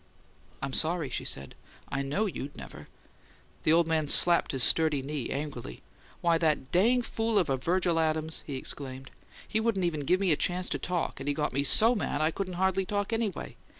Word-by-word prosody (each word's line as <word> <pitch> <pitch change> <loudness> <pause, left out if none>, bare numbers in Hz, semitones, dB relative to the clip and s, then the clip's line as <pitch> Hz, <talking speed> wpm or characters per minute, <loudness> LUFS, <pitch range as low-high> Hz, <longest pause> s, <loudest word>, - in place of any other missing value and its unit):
"I'm 135 -1 -3
sorry," 160 -4 +2
she - - -3
said. 70 -1 -2 0.4
"I 135 - -2
know 145 +11 -1
you'd 145 -8 -6
never - - -10 0.4
" - - -30
The 155 - +3
old 165 0 +4
man 160 -2 0
slapped 175 +3 +4
his 135 -3 0
sturdy 155 0 +2
knee, 140 -2 -4
angrily. 140 - -6 0.4
"Why, 170 -1 +2
that 155 -5 0
dang 235 +8 +3
fool 225 -1 -1
of 170 -8 +2
a - - +2
Virgil 170 +4 +1
Adams!" 160 0 -1
he 140 - -4
exclaimed. 130 0 -4 0.4
"He 215 - 0
wouldn't 220 -5 0
even 165 -3 -1
give 180 +6 +1
me 195 -3 +2
a - - +4
chance 180 +4 -1
to - - -2
talk; 180 -1 -3
and 135 - -7
he 145 - 0
got 150 0 -1
me 140 - +1
so 220 - +6
mad 205 -9 -2
I 155 +1 +2
couldn't 185 +1 -4
hardly 190 +1 +1
talk, 205 +2 -2
anyway! 225 -4 -3
160 Hz, 205 wpm, -29 LUFS, 145-185 Hz, 0.4 s, so